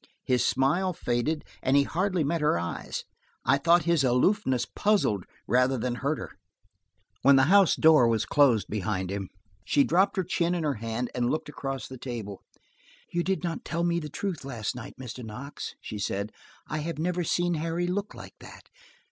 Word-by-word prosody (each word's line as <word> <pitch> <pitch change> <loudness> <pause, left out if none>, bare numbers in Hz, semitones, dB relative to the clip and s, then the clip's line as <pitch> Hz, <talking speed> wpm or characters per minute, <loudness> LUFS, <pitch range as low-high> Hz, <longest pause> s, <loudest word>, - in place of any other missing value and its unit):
His 125 -1 +2
smile 175 +8 +2
faded 150 +3 -1 0.2
and 135 +2 +3
he 140 - +5
hardly 180 +2 0
met 165 +3 -1
her 150 - +3
eyes: 85 0 -4 0.4
I 135 +3 +4
thought 170 +4 +5
that - - -10
his 170 -4 +3
aloofness 130 - +2
puzzled 160 - +1 0.2
rather 125 +1 +3
than 125 +1 -1
hurt 140 +5 -1
her. - - -7 0.9
When 140 +2 +6
the 135 - +6
house 200 -3 +6
door 155 -7 +6
had 110 0 0
closed 130 -8 +4
behind 95 -2 -2
him, 100 -1 -4 0.3
she 140 +9 +3
dropped 190 +6 +2
her 190 - +2
chin 175 0 0
in 170 - -2
her 150 -2 +1
hand 115 +2 -4
and 120 -1 0
looked 155 - -2
across 135 -2 -5
the 130 -1 -10
table. 110 -6 -6 0.7
"You 175 - +1
did 190 0 -1
not 170 -2 -3
tell 170 0 -2
me 170 0 +1
the 150 -2 -6
truth 175 +1 -4
last 120 -4 -4
night, 125 +2 -8
Mr. 125 -1 -7
Knox," 125 +6 -7
she 105 - -7
said. 100 +1 -2 0.4
"I 155 - -3
have 165 +2 -4
never 175 +2 -1
seen 175 +2 +1
Harry 165 +2 -1
look 200 +3 -3
like - - -10
that. - - -13
140 Hz, 190 wpm, -27 LUFS, 120-170 Hz, 0.9 s, When